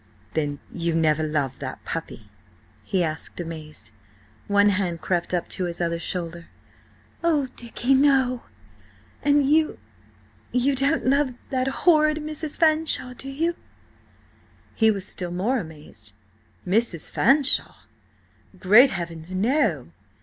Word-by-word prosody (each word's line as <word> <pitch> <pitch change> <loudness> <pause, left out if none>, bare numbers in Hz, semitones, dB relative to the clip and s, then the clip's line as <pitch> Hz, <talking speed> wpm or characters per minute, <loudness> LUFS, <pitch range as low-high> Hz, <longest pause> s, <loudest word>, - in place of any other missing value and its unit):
"Then 145 -2 -1 0.2
you 170 -1 -1
never 155 -1 +2
loved 145 -4 -2
that 130 -2 -7
puppy?" 165 -8 -5 0.6
he 180 - 0
asked, 155 +1 -5
amazed. 160 -6 -7 0.6
One 205 0 +4
hand 185 -4 -1
crept 175 -1 -1
up 180 -1 -1
to 185 - -1
his 170 -1 -5
other 170 -1 -1
shoulder. 170 -1 -4 0.8
"Oh, 300 -6 +1
Dicky, 240 +2 -1
no! 265 -3 +3 0.8
And–and 290 -1 +3
you–you 280 -3 -2
don't 280 +4 +1
love 270 -1 +2 0.2
that 260 -1 0
horrid 305 +1 +3
Mrs. 305 0 -3
Fanshawe, 310 -5 +4
do 270 +2 -8
you?" 330 +5 -1 1.2
He 220 -1 +3
was 200 -3 -1
still 180 -2 -5
more 205 +9 0
amazed. 150 - -10 0.5
"Mrs. 190 -4 0
Fanshawe? 275 +2 +3 0.8
Great 215 +8 +7
heavens, 170 -3 -6
no! 195 - 0
205 Hz, 120 wpm, -24 LUFS, 165-275 Hz, 1.2 s, Great